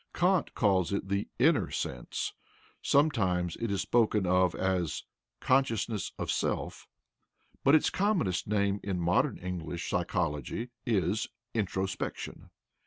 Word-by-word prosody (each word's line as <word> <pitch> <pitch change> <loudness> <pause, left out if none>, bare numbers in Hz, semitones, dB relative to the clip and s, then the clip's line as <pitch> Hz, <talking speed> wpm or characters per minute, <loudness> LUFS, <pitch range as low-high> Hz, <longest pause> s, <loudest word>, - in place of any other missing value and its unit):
Kant 180 0 +2
calls 95 -5 +2
it 100 -1 -2
the 100 +1 0
"inner - - +3
sense"; - - -3 0.5
sometimes 95 - +2
it 115 - -2
is 100 -1 0
spoken 110 -4 +2
of 90 0 +3
as 95 -4 -1 0.4
"consciousness 115 -6 +1
of - - -2
self"; - - -2 0.8
but 140 +3 +6
its 155 - +3
commonest 185 - +1
name 100 -1 +1
in 95 -3 -2
modern 85 +1 +2
English 85 -2 -5
psychology 90 - -1 0.2
is 105 -2 +1 0.3
"introspection." 95 -3 -3
100 Hz, 115 wpm, -30 LUFS, 90-115 Hz, 0.8 s, but